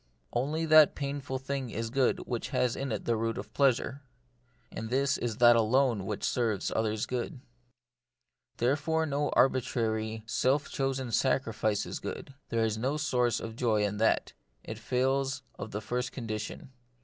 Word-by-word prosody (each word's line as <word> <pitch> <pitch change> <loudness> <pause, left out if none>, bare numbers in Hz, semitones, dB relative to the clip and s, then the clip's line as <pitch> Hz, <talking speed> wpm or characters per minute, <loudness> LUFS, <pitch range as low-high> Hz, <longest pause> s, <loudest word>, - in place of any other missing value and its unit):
Only 150 +6 0
that 155 -1 +7
painful 140 -2 -3
thing 135 -1 -4
is 115 0 -4
good 135 -1 +2
which 120 -1 -3
has 125 -3 +1
in 135 -2 -3
it 110 - -3
the 120 - +2
root 115 +1 -1
of 105 +2 -7
pleasure. 135 0 +2 0.7
And 110 - -5
this 140 +2 +2
is 115 -3 -3
that 120 -1 +7
alone 115 -2 +2
which - - -4
serves 110 -6 0
others' 110 -1 0
good. 125 +3 -4 1.2
Therefore 150 +6 +1
no 145 -1 0
arbitrary, 110 -4 +1
self 130 +6 +1
chosen 135 -2 -2
sacrifice 110 -4 +1
is - - -5
good; 135 - -6 0.2
there 115 -1 +1
is 110 -1 -1
no 135 +6 0
source 125 -6 +1
of 115 0 -6
joy 110 -4 +1
in 105 0 -1
that; 110 +1 +1 0.3
it - - -7
fails 130 +1 0 0.2
of 100 - -5
the 105 0 -4
first 125 +3 -2
condition. 110 +1 -5
125 Hz, 160 wpm, -30 LUFS, 110-135 Hz, 1.2 s, that